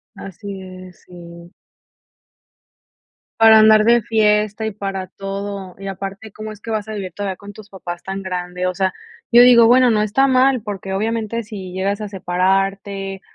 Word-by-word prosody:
Así 195 +1 -9
es, 185 -1 -12
sí. 170 -1 -13 1.9
Para 220 -1 +8
andar 215 0 +6
de 235 +1 +4
fiesta 215 0 +1
y 220 - -2
para 195 -2 -5
todo, 195 -1 -6
y 195 +1 -8
aparte 195 +3 -7
cómo 215 +1 -8
es 210 - -16
que 225 - -7
vas 215 -1 -2
a 220 - -6
vivir 195 -4 -5
todavía 195 -1 -4
con 200 +1 -12
tus 210 0 -14
papás 175 -3 -7
tan 195 0 -6
grande. 180 -1 -4
O 185 - 0
sea, 190 0 -1 0.4
yo 240 0 +7
digo, 240 -2 +7
bueno, 250 +1 +5
no 215 -1 +2
está 215 +6 +2
mal, 260 -1 +3
porque, 195 -3 -6
obviamente, 225 +2 -2
si 195 -4 -9
llegas 200 +2 -2
a 210 - -5
separarte 195 +1 -1
200 Hz, 170 wpm, -19 LUFS, 190-215 Hz, 1.9 s, Para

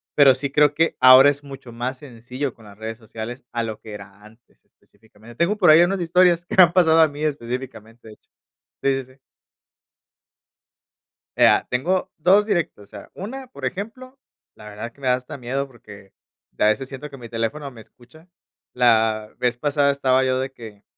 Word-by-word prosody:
Pero 135 -3 +6
sí 135 +1 -4
creo 150 0 +3
que 165 +2 0
ahora 130 +2 +8
es 145 0 -3
mucho 135 -3 -11
más 125 +3 -5
sencillo, 125 0 -6
con 110 - -19
las 100 0 -15
redes 110 0 -7
sociales 115 +2 -9
a 120 -1 -1
lo 110 -1 -6
que 110 - -11
era 100 0 -12
antes, 110 +2 -22
específicamente. 110 +1 -20
Tengo 175 - +1
por 180 -6 +4
ahí 155 +2 +8
unas 190 +1 -1
historias 175 0 +3
que - - -5
me 185 - +10
han 175 0 +2
pasado 165 -3 +4
a 160 - +6
mí 145 +1 -8
específicamente, 120 -5 -6
de - - -12
hecho, - - -44 0.6
sí, 135 -1 0
sí, 130 +1 -21
sí. - - -31 2.2
Eh, - - +7
ah, - - +3
tengo 175 +10 -1
2 195 +6 +3
directos. 170 - -2
O - - -28
sea, - - -13
una, 260 +8 -8
por 250 - -15
ejemplo, 255 +7 -8 0.4
la 105 - -13
verdad 105 +3 -7
es - - -14
que 140 - -24
me 130 - -3
da 125 - +4
hasta 125 +2 -5
miedo, 135 +3 -3
porque 105 -6 -16 0.5
a - - +2
veces 110 +5 0
siento 140 +2 -9
que 135 - -10
mi 115 -3 -11
teléfono 130 +6 -4
me 120 -4 -15
escucha. 140 +10 -20 0.5
La 110 -3 +2
vez 125 -1 0
pasada 145 +1 +1
estaba 130 -1 +1
yo 130 0 0
de 135 +1 -4
que 110 -5 -13
130 Hz, 200 wpm, -21 LUFS, 115-150 Hz, 2.2 s, me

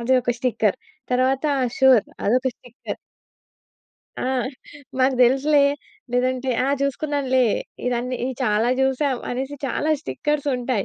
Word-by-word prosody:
అది 235 +3 0
ఒక 245 - +1
స్టిక్కర్ 225 -5 +1 0.4
తర్వాత 260 +3 +2 0.2
ఆ! - - +2
సూర్ 260 -5 +6 0.2
అదొక 255 +5 +2
స్టిక్కర్. 245 -1 -8 1.2
ఆ! - - -3 0.8
మాకు 260 0 +3
దేలుసులే, 275 +4 +4 0.5
లేదంటే 255 +1 0 0.2
ఆ! - - +1
చూసుకున్నానులే 280 -2 +1 0.4
ఇదన్ని 250 +1 -1
ఈ - - -1
చాలా 220 0 +2
చూసాం 265 -1 +1
అనేసి 265 +3 -3
చాలా 300 +4 -1
స్టిక్కర్స్ 295 -1 -2
ఉంటాయి. 245 -4 -1
255 Hz, 120 wpm, -22 LUFS, 245-270 Hz, 1.2 s, సూర్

